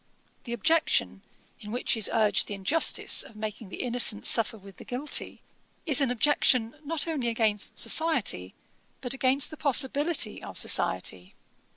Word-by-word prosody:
The 235 Hz, -, -6 dB
objection, 235 Hz, -, 0 dB, 0.4 s
in 210 Hz, -, -10 dB
which 245 Hz, +1 st, -2 dB
is 220 Hz, -3 st, 0 dB
urged 210 Hz, -5 st, +1 dB
the 205 Hz, -, -6 dB
injustice 240 Hz, +12 st, +3 dB
of 225 Hz, -, -8 dB
making 215 Hz, -1 st, -7 dB
the -, -, -6 dB
innocent 240 Hz, -3 st, +2 dB
suffer 225 Hz, -1 st, +5 dB
with 195 Hz, -2 st, -16 dB
the -, -, -12 dB
guilty, 275 Hz, +3 st, -3 dB, 0.4 s
is 290 Hz, -3 st, +1 dB
an 270 Hz, -, +1 dB
objection 250 Hz, -2 st, +1 dB
not 320 Hz, +2 st, -2 dB
only 295 Hz, -7 st, -3 dB
against 220 Hz, -3 st, -1 dB
society, 255 Hz, -, 0 dB, 0.4 s
but 250 Hz, -1 st, -2 dB
against 265 Hz, +2 st, +1 dB
the 310 Hz, -, -10 dB
possibility 280 Hz, -1 st, +1 dB
of -, -, -10 dB
society. 90 Hz, 0 st, -1 dB
240 Hz, 150 wpm, -26 LUFS, 210-280 Hz, 0.4 s, suffer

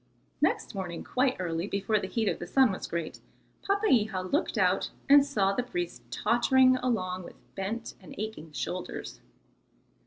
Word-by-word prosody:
Next -, -, +1 dB
morning 185 Hz, -4 st, -5 dB
quite 255 Hz, 0 st, +1 dB
early, 170 Hz, 0 st, -2 dB
before 200 Hz, +2 st, 0 dB
the 190 Hz, -, -4 dB
heat 225 Hz, +1 st, -1 dB
of -, -, 0 dB
the 175 Hz, -, -6 dB
sun 260 Hz, +3 st, +4 dB
was 190 Hz, -, -5 dB
great, 170 Hz, -2 st, -4 dB, 0.4 s
Papeiha 245 Hz, -, +2 dB
looked 295 Hz, -, 0 dB
out -, -, +2 dB, 0.2 s
and 285 Hz, 0 st, +8 dB
saw 205 Hz, -9 st, +1 dB
the 225 Hz, -, 0 dB
priest 175 Hz, -, -4 dB
tottering 255 Hz, -, +4 dB
along 185 Hz, -8 st, -1 dB
with 175 Hz, -, -11 dB, 0.2 s
bent 220 Hz, +5 st, -4 dB
and -, -, -11 dB
aching 215 Hz, -7 st, -5 dB
shoulders. 150 Hz, -, -5 dB
210 Hz, 155 wpm, -29 LUFS, 185-255 Hz, 0.4 s, and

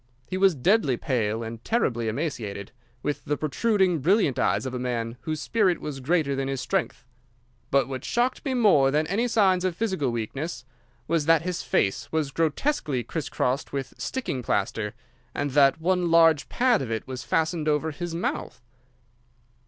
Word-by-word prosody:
He 185 Hz, -, -5 dB
was 190 Hz, -2 st, +4 dB
deadly 150 Hz, -, +2 dB
pale 115 Hz, -4 st, -1 dB
and 115 Hz, 0 st, -7 dB
terribly 120 Hz, -, 0 dB
emaciated, 110 Hz, -6 st, -4 dB, 0.3 s
with 145 Hz, -, -2 dB
the 145 Hz, -, -1 dB
protruding, 185 Hz, +2 st, +1 dB
brilliant 175 Hz, -, +2 dB
eyes -, -, +1 dB
of 130 Hz, -, -4 dB
a 125 Hz, -, -3 dB
man 120 Hz, -2 st, -2 dB
whose 155 Hz, -1 st, -3 dB
spirit 190 Hz, 0 st, +1 dB
was 145 Hz, -3 st, -5 dB
greater 145 Hz, 0 st, +1 dB
than 135 Hz, 0 st, -2 dB
his 135 Hz, -1 st, -2 dB
strength. 190 Hz, -4 st, -2 dB, 0.6 s
But 135 Hz, -3 st, +3 dB
what 130 Hz, -1 st, -5 dB
shocked 245 Hz, +2 st, 0 dB
me 270 Hz, -3 st, -1 dB
more 195 Hz, -, +5 dB
than 150 Hz, +3 st, +1 dB
any 205 Hz, +9 st, 0 dB
signs 195 Hz, -6 st, +3 dB
of 185 Hz, -2 st, 0 dB
physical 190 Hz, -, -1 dB
weakness 120 Hz, +4 st, -4 dB, 0.4 s
was 165 Hz, -3 st, 0 dB
that 165 Hz, -1 st, +5 dB
his 180 Hz, 0 st, -2 dB
face 135 Hz, +9 st, 0 dB
was 155 Hz, -3 st, -1 dB
grotesquely 155 Hz, -, 0 dB
criss 145 Hz, +4 st, -4 dB
crossed 130 Hz, +3 st, -1 dB
with 135 Hz, -1 st, -4 dB
sticking 245 Hz, -, -3 dB
plaster, 105 Hz, 0 st, -1 dB, 0.4 s
and 145 Hz, -1 st, -1 dB
that 140 Hz, +1 st, +4 dB
one 180 Hz, +1 st, +1 dB
large 165 Hz, -2 st, +5 dB
pad 245 Hz, -, +2 dB
of 130 Hz, -, -4 dB
it 110 Hz, -1 st, -3 dB
was 130 Hz, -1 st, -6 dB
fastened 160 Hz, -1 st, 0 dB
over 150 Hz, +1 st, +1 dB
his 165 Hz, +3 st, -5 dB
mouth. 170 Hz, -, -3 dB
150 Hz, 170 wpm, -26 LUFS, 130-180 Hz, 0.6 s, more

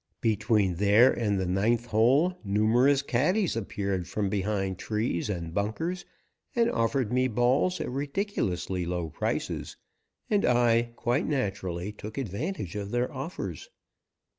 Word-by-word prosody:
Between 105 Hz, -4 st, +2 dB
there 105 Hz, +6 st, +6 dB
and 105 Hz, -4 st, 0 dB
the 95 Hz, -, -1 dB
ninth 110 Hz, +6 st, +1 dB
hole 130 Hz, +11 st, +3 dB
numerous 115 Hz, +7 st, +3 dB
caddies 165 Hz, -, +1 dB
appeared 100 Hz, -4 st, -2 dB
from 100 Hz, +1 st, -1 dB
behind 95 Hz, -2 st, -1 dB
trees 105 Hz, -3 st, -1 dB
and 85 Hz, -4 st, -4 dB
bunkers 160 Hz, -, -2 dB, 0.5 s
and 235 Hz, 0 st, +3 dB
offered 115 Hz, 0 st, 0 dB
me 130 Hz, +1 st, +3 dB
balls 125 Hz, +9 st, +2 dB
at -, -, -3 dB
ridiculously 125 Hz, -, -2 dB
low 85 Hz, -2 st, -3 dB
prices, -, -, -3 dB, 0.5 s
and 205 Hz, -2 st, +2 dB
I, 120 Hz, -1 st, +3 dB
quite 120 Hz, +5 st, 0 dB
naturally, 100 Hz, -, -2 dB
took 105 Hz, +2 st, -9 dB
advantage 110 Hz, -, -4 dB
of 100 Hz, -1 st, -4 dB
their 120 Hz, +6 st, -1 dB
offers. 140 Hz, -, -6 dB
110 Hz, 130 wpm, -28 LUFS, 100-135 Hz, 0.5 s, there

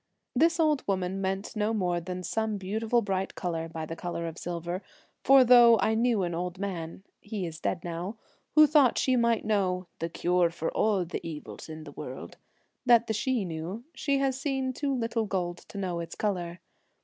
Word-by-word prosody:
This 330 Hz, +6 st, +3 dB
old 305 Hz, -3 st, +3 dB
woman 190 Hz, -1 st, -1 dB
meant 195 Hz, +3 st, -2 dB
no 215 Hz, +1 st, 0 dB
more 180 Hz, -4 st, 0 dB
than 180 Hz, +1 st, -5 dB
some 220 Hz, +1 st, -1 dB
beautiful 220 Hz, +5 st, 0 dB
bright 195 Hz, -1 st, -2 dB
colour 165 Hz, -2 st, -3 dB
by 160 Hz, -1 st, -5 dB
the 165 Hz, -, -6 dB
colour 170 Hz, 0 st, -4 dB
of 165 Hz, +1 st, -7 dB
silver, 175 Hz, +1 st, -4 dB, 0.4 s
for 270 Hz, -1 st, +7 dB
though 240 Hz, -2 st, +8 dB
I 220 Hz, -, +2 dB
knew 225 Hz, -3 st, +2 dB
an 175 Hz, -1 st, -2 dB
old 180 Hz, +2 st, -3 dB
man 185 Hz, -3 st, -5 dB
— -, -, -51 dB
he 205 Hz, -3 st, -4 dB
is 165 Hz, -1 st, -7 dB
dead 175 Hz, -, -2 dB
now 175 Hz, +6 st, -4 dB, 0.2 s
— -, -, -42 dB
who 305 Hz, 0 st, +9 dB
thought 290 Hz, -5 st, +4 dB
she 260 Hz, -, +2 dB
might 235 Hz, -2 st, +2 dB
know 190 Hz, -4 st, +1 dB
' -, -, -47 dB
the 165 Hz, -, -2 dB
cure 175 Hz, +1 st, +2 dB
for 165 Hz, -1 st, -3 dB
all 205 Hz, -4 st, +1 dB
the 170 Hz, -, -5 dB
evils 160 Hz, -1 st, -8 dB
in 155 Hz, 0 st, -7 dB
the 145 Hz, -, -10 dB
world,' -, -, -8 dB, 0.5 s
that 240 Hz, -2 st, +5 dB
the 220 Hz, -, -1 dB
Sidhe 235 Hz, 0 st, 0 dB
knew, 170 Hz, +6 st, -5 dB
she 280 Hz, -2 st, 0 dB
has 270 Hz, -1 st, 0 dB
seen 270 Hz, -2 st, -1 dB
too 280 Hz, +2 st, -2 dB
little 230 Hz, -3 st, -1 dB
gold 175 Hz, -3 st, -2 dB
to -, -, -10 dB
know 180 Hz, -3 st, -2 dB
its 170 Hz, -1 st, -6 dB
colour. 180 Hz, -4 st, -2 dB
195 Hz, 205 wpm, -28 LUFS, 175-235 Hz, 0.5 s, who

